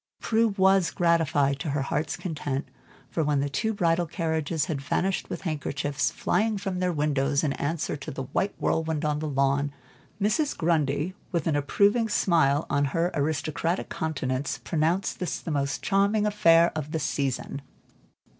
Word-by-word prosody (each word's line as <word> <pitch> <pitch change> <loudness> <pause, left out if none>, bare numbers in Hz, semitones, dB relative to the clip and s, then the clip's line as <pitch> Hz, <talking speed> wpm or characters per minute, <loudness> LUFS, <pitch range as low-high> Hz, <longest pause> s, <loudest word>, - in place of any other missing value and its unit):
Prue 230 0 +2
was 190 -2 +4
gratified 155 -5 +2
to 150 - -3
her 140 -1 0
heart's 150 +2 -2
content, 145 -5 -3 0.4
for, 160 - 0
when 145 -1 +1
the 140 +1 0
two 220 +10 0
bridal 175 -4 +1
carriages 160 -2 -1
had 150 -5 -3
vanished 185 +7 -1
with - - -5
handkerchiefs 145 -3 -1
flying 215 +3 0
from 190 -2 -3
their 180 0 +1
windows, 145 -2 +1
in 145 -3 +1
answer 155 +3 -2
to 140 - -8
the 135 - -5
white 195 +9 -1
whirlwind 160 -2 0
on 150 -1 0
the 155 - -3
lawn, 140 0 +1 0.5
Mrs. 275 +9 +1
Grundy, 160 0 +1 0.2
with 170 -4 -1
an 160 - +1
approving 205 +10 +2
smile 160 -7 +3
on 145 0 +1
her 165 +6 0
aristocratic 155 +4 -1
countenance, 135 -3 -2
pronounced 170 +4 0
this 180 - -2
the 165 - -5
most 140 -1 -1
charming 200 +2 +2
affair 170 -5 +5
of 155 -1 -4
the 160 - 0
season. 140 -1 -2
160 Hz, 160 wpm, -26 LUFS, 145-180 Hz, 0.5 s, affair